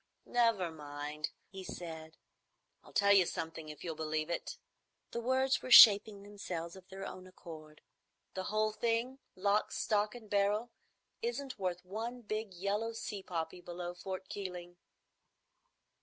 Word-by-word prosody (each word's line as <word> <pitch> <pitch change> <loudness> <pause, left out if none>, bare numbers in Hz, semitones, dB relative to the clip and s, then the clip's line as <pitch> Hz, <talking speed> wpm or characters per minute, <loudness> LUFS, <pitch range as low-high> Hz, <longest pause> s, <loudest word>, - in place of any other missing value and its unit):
"Never 230 -8 +2
mind," 150 0 -5 0.2
he 190 0 -7
said. 160 -3 -7 0.7
"I'll - - -15
tell 200 0 +5
you 190 -3 +6
something, 160 -2 -5
if 150 - -9
you'll 170 - -3
believe 155 +1 -2
it." - - -3 0.5
The 235 - -3
words 260 +2 +2
were - - -6
shaping 205 -3 +9
themselves 180 -5 -5
of 190 -1 -13
their 195 0 -6
own 185 -1 -8
accord. 155 -4 -11 0.5
"The 185 0 -4
whole 215 0 +1
thing, 235 +4 -1 0.2
lock, 200 +2 +1
stock, 210 +1 +1
and 230 -3 -10
barrel, 205 +3 +1 0.5
isn't 285 - -3
worth 180 -1 -2
one 230 +6 -4
big 215 -1 -3
yellow 205 +5 -1
sea 215 -3 -5
poppy 170 -1 -4
below 175 0 -5
Fort 190 +1 -6
Keeling." 180 -3 -6
195 Hz, 140 wpm, -34 LUFS, 170-215 Hz, 0.7 s, shaping